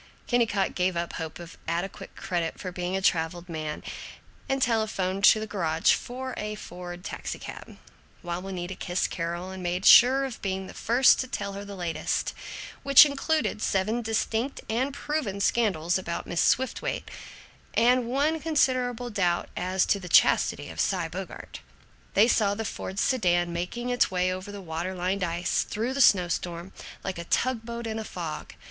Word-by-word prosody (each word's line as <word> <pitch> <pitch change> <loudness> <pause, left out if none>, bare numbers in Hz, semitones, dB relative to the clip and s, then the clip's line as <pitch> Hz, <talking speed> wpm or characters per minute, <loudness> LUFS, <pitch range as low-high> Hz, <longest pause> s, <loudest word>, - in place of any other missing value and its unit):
Kennicott 230 -5 +1
gave 180 -1 0
up 170 0 -3
hope 160 -2 -5
of 170 -1 -11
adequate 175 +4 -4
credit 175 -4 -3
for 185 - -5
being 180 +1 -2
a 190 - -4
traveled 170 0 +1
man, 155 -3 -5 0.7
and 270 0 +1
telephoned 215 -5 0
to 215 +1 +6
a - - -3
garage 165 -6 +2
for 255 +1 -4
a 210 0 -3
Ford 175 -2 -8
taxicab, - - -7 0.5
while 175 0 -3
Juanita 185 -1 -5
kissed 180 0 -2
Carol 170 +2 -3
and 190 0 -7
made 180 +2 -2
sure 265 +3 +8
of 260 -4 -7
being 190 -1 -2
the 190 - -10
first 245 +3 +4
to 255 - -2
tell 200 -5 -4
the 200 0 -7
latest, 175 -3 -2 0.5
which 275 +1 +9
included 290 -4 -1
seven 215 +5 0
distinct 225 +3 -1
and 250 +5 0
proven 280 -8 -3
scandals 190 -5 +1
about 170 -2 -4
Mrs. 175 - +2
Swiftwaite, 260 +1 -4 0.6
and 245 +1 +4
one 290 +6 +1
considerable 255 -6 +1
doubt 180 -4 0
as 185 +1 +1
to 200 - +1
the 180 -2 -8
chastity - - +4
of - - -10
Cy - - 0
Bogart. - - -7 0.6
They 210 +3 +6
saw 205 -4 +2
the 225 +1 -4
Ford 190 -1 -5
sedan 175 -8 +2
making 235 +9 -3
its 245 - +3
way 185 0 +1
over 185 +2 -7
the 205 -1 -7
water 175 +2 -4
lined 185 +2 -1
ice, 175 0 0
through 230 +5 -2
the 275 - 0
snow 185 -7 +6
storm, 175 +2 -4 0.3
like 190 -3 -4
a 170 - -6
tug 250 +4 0
boat 235 0 -5
in 220 0 -3
a - - -4
fog. 170 -6 -6
195 Hz, 170 wpm, -27 LUFS, 175-235 Hz, 0.7 s, which